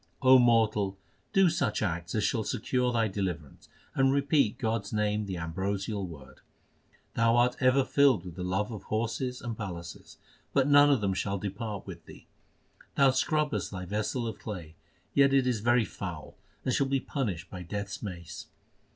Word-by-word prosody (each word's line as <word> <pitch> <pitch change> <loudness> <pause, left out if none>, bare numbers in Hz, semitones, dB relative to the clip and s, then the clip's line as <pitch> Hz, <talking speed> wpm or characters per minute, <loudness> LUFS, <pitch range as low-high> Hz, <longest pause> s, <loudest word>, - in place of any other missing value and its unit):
O 130 0 +8
mortal, 110 -5 +3 0.3
do 195 -1 +5
such 155 -11 0
acts 85 -2 -3
as 110 - +1
shall 110 +1 +1
secure 125 +3 0
thy 115 -2 +2
deliverance, 90 -7 -5 0.2
And 135 0 +3
repeat 140 -4 +2
God 110 0 0
s 100 - -10
name 105 -1 0
the 95 -2 -4
ambrosial 95 +4 -3
word. 65 -6 -12 0.7
Thou 115 +1 +3
art 125 +1 +3
ever 130 0 +4
filled 135 -11 +3
with 90 - -7
the 90 - -7
love 95 +5 -1
of 105 -4 -6
horses 115 +4 -2
and 120 -2 -4
palaces, 85 -6 -8 0.4
But 135 -1 +3
none 145 0 +7
of 135 -6 +3
them 100 -2 +1
shall 100 +1 -2
depart 100 +1 -5
with 85 -4 -10
thee. - - -13 0.7
Thou 140 -1 +5
scrubbest 150 +3 0
thy 90 -2 -6
vessel 110 +5 -2
of 115 - -5
clay; 90 -8 -7 0.4
Yet 140 -1 +4
it 135 -2 +4
is 125 -4 0
very 120 +1 +3
foul, 85 -7 -7 0.3
and 130 - +1
shall 140 - +2
be 135 0 +1
punished 110 - -4
by 90 - -7
Death 100 +4 -4
s 105 - -7
mace. 85 -6 -7
110 Hz, 175 wpm, -29 LUFS, 95-125 Hz, 0.7 s, O